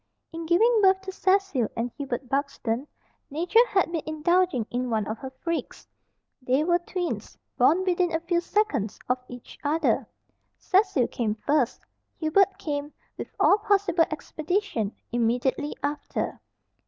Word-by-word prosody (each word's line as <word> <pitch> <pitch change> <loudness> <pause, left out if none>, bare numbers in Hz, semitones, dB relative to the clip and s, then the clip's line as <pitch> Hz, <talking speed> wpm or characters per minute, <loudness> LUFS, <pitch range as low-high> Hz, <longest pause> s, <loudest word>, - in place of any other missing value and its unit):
In 330 0 -5
giving 440 +7 +4
birth 380 -1 +5
to 385 0 -6
Cecil 380 - +1
and 235 +1 -1
Hubert 265 -3 -4
Buxton, 270 -2 -2 0.4
Nature 355 - +3
had 380 -6 +1
been 330 -2 -1
indulging 315 -4 +1
in 250 +1 -1
one 220 -3 0
of 220 +1 -4
her 265 - -6
freaks. 320 +6 -5 0.5
They 255 +3 +2
were 345 +1 +3
twins 355 0 -4 0.2
born 305 +8 +4
within 360 -1 +1
a 325 - 0
few 340 +1 0
seconds 345 - 0
of 250 +1 +1
each 245 -1 -11
other. 310 +3 +1 0.5
Cecil 380 - +2
came 220 -3 -1
first. 280 +2 0 0.3
Hubert 375 +5 +3
came, 290 -1 -3 0.2
with - - -6
all 405 - +5
possible 395 -5 +3
expedition, 310 - -2 0.2
immediately 245 +5 0
after. 290 +1 -3
315 Hz, 140 wpm, -26 LUFS, 255-370 Hz, 0.5 s, birth